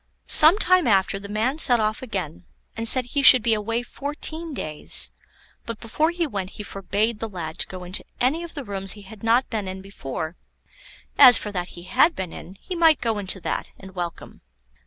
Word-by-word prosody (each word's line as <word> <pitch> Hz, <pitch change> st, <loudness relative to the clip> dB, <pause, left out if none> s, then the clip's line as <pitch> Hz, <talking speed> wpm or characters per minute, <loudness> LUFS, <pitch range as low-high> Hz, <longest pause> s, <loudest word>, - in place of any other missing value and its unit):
Some 315 Hz, +6 st, +6 dB
time 370 Hz, -7 st, +3 dB
after 195 Hz, -2 st, +2 dB
the 200 Hz, 0 st, -9 dB
man 230 Hz, +8 st, -1 dB
set 245 Hz, -6 st, +3 dB
off 215 Hz, 0 st, -1 dB
again, 185 Hz, -, -6 dB, 0.3 s
and 225 Hz, +1 st, +1 dB
said 255 Hz, +1 st, +5 dB
he 280 Hz, +3 st, -2 dB
should 255 Hz, -3 st, +8 dB
be 230 Hz, -1 st, +2 dB
away 225 Hz, +3 st, -2 dB
fourteen 310 Hz, +5 st, -6 dB
days; 155 Hz, -, +1 dB, 0.6 s
but 230 Hz, -2 st, -6 dB
before 305 Hz, +8 st, -1 dB
he 345 Hz, 0 st, -2 dB
went 195 Hz, -9 st, -5 dB
he 210 Hz, -, -6 dB
forbade 205 Hz, +3 st, -2 dB
the 225 Hz, -, -5 dB
lad 165 Hz, -5 st, -7 dB
to -, -, +1 dB
go 185 Hz, -1 st, -8 dB
into 180 Hz, +2 st, -2 dB, 0.2 s
any 275 Hz, +7 st, +1 dB
of 340 Hz, -1 st, -9 dB
the 285 Hz, -, -5 dB
rooms 195 Hz, -3 st, -3 dB
he 205 Hz, -, -13 dB
had 200 Hz, +1 st, -13 dB
not 235 Hz, +4 st, +1 dB
been 215 Hz, -4 st, -3 dB
in 185 Hz, 0 st, -6 dB
before; 160 Hz, -4 st, -7 dB, 0.8 s
as 250 Hz, -4 st, +10 dB
for 210 Hz, -, -5 dB
that 180 Hz, -2 st, -5 dB
he 175 Hz, -, -10 dB
had 285 Hz, -, +3 dB
been 185 Hz, -3 st, -6 dB
in, 185 Hz, -, -11 dB
he 360 Hz, -, -8 dB
might 325 Hz, -4 st, +4 dB
go 225 Hz, -3 st, -2 dB
into 190 Hz, -1 st, -2 dB
that, -, -, -4 dB
and 190 Hz, -1 st, -13 dB
welcome. 175 Hz, -2 st, -7 dB
220 Hz, 205 wpm, -23 LUFS, 190-265 Hz, 0.8 s, as